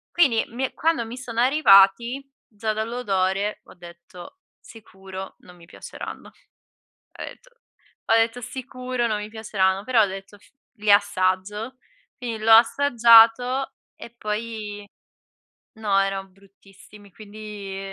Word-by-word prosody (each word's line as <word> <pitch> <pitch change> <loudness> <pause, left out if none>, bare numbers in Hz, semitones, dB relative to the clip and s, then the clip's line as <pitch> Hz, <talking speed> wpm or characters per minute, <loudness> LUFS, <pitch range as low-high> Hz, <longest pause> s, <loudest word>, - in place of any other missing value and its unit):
Quindi 275 -10 +3
mi 255 +3 -3
quando 320 -6 0
mi 235 +3 -9
sono 235 -3 -6
arrivati, 240 -2 +4 0.2
già 215 0 -4
dall'odore 210 -3 -2
ho - - -17
detto: 175 - -14 0.2
"Sicuro 190 -3 -11
non 180 - -17
mi 170 -1 -17
piaceranno." - - -10
Ho - - -24 0.7
detto - - -12 0.6
ho 225 - +3
detto: 225 +1 +1
"Sicuro 255 0 -4
non 215 -2 -1
mi 210 - -7
piaceranno." 200 -3 -1
Però 240 -1 +3
ho - - +3
detto: 195 +1 -9
"F 205 - -24 0.2
li 210 0 0
assaggio." 205 +4 0 0.4
Quindi 230 -4 -6
l'ho 225 - +3
assaggiato 240 +1 +5 0.2
e 235 - -12
poi 210 -2 -5 0.9
no, 205 -3 0
erano 195 0 -2
bruttissimi, 195 +1 -19
quindi 210 -2 -9
215 Hz, 125 wpm, -23 LUFS, 195-235 Hz, 0.9 s, assaggiato